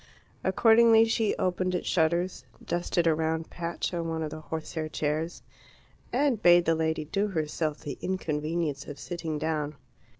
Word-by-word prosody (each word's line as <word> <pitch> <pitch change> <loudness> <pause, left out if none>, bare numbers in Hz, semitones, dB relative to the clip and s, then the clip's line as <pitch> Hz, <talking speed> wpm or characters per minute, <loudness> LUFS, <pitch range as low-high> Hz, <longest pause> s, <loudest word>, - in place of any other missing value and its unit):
Accordingly 225 0 +6
she 225 -1 +1
opened 185 0 0
its 180 - -3
shutters, 170 +2 +1 0.2
dusted 175 0 0
a 165 - +5
round 160 +1 -2
patch 170 +1 -3
on 170 -1 -2
one 160 0 -2
of 155 - -4
the 155 - -7
horsehair 160 0 -4
chairs, 155 +2 -2 0.7
and 255 -4 +1
bade 175 0 +6
the 165 - +3
lady 160 -1 -1
do 200 +7 0
herself 155 -4 -2
the 140 -3 -6
inconvenience 155 -4 -2
of 145 - -7
sitting 165 0 -4
down. 150 -1 -2
165 Hz, 155 wpm, -28 LUFS, 155-180 Hz, 0.7 s, Accordingly